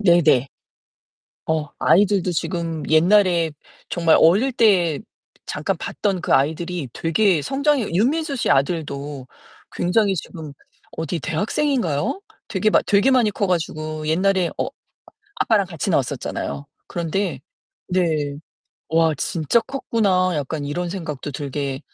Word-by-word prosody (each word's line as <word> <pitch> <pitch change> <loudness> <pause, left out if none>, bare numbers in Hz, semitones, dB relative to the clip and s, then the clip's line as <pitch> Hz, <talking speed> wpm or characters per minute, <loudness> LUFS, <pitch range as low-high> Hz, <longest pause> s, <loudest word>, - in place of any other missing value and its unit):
네네. 170 - +4 1.0
어 155 -2 -1
아이들도 195 -1 +3
지금 165 -1 -3
옛날에 170 0 +4 0.4
정말 170 -2 +3
어릴 205 +12 +4
때 185 - +3 0.5
잠깐 - - -2
봤던 195 -4 -2
그 - - -1
아이들이 160 +2 0
되게 170 +1 +2
성장이 280 - +1
윤민수 280 - +1
씨 240 - 0
아들도 140 -2 -1 0.5
굉장히 195 +3 +1
지금 155 -2 -7 0.4
어디 160 +1 -3
대학생인가요? 220 - -1 0.3
되게 215 +1 +1
많 - - +4
되게 205 +5 +4
많이 245 -5 +4
커 205 0 -1
가지고 155 -3 -2
옛날에 185 +2 +2
어 - - 0 0.7
아빠랑 210 -3 +2
같이 175 0 -4
나왔었잖아요. 140 -1 -2 0.2
그런데 170 -2 -2 0.5
네. 160 -6 0 0.6
'와 160 -1 +3
진짜 160 - +1
컸구나.' 200 - 0
약간 145 +1 -3
이런 175 +4 -3
생각도 155 -6 -5
들게 140 -1 -4
175 Hz, 265 characters per minute, -21 LUFS, 155-200 Hz, 1.0 s, 네네